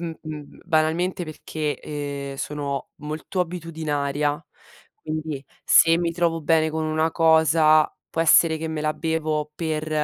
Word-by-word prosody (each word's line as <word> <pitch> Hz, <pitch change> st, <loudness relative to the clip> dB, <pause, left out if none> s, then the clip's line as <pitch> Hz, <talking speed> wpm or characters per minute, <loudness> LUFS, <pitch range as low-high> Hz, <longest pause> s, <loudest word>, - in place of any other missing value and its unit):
uhm 165 Hz, -1 st, -4 dB
uhm, 150 Hz, -2 st, -8 dB
banalmente 170 Hz, +2 st, +1 dB
perché, 155 Hz, -1 st, -4 dB
ehm, 140 Hz, -2 st, -5 dB
sono 140 Hz, -1 st, -4 dB
molto 155 Hz, +5 st, -4 dB
abitudinaria, 150 Hz, -4 st, -2 dB, 0.6 s
quindi 155 Hz, -3 st, -4 dB, 0.2 s
se 165 Hz, 0 st, +6 dB
mi 170 Hz, -1 st, -1 dB
trovo 165 Hz, -1 st, 0 dB
bene 160 Hz, +1 st, +3 dB
con 160 Hz, 0 st, -2 dB
una 155 Hz, +1 st, +1 dB
cosa, 160 Hz, -1 st, +4 dB, 0.2 s
può 165 Hz, -, -2 dB
essere 160 Hz, 0 st, +5 dB
che 160 Hz, -, -4 dB
me 155 Hz, -1 st, -3 dB
la 155 Hz, 0 st, +1 dB
bevo 155 Hz, -2 st, -2 dB
per 155 Hz, -1 st, -3 dB
155 Hz, 140 wpm, -23 LUFS, 150-165 Hz, 0.6 s, se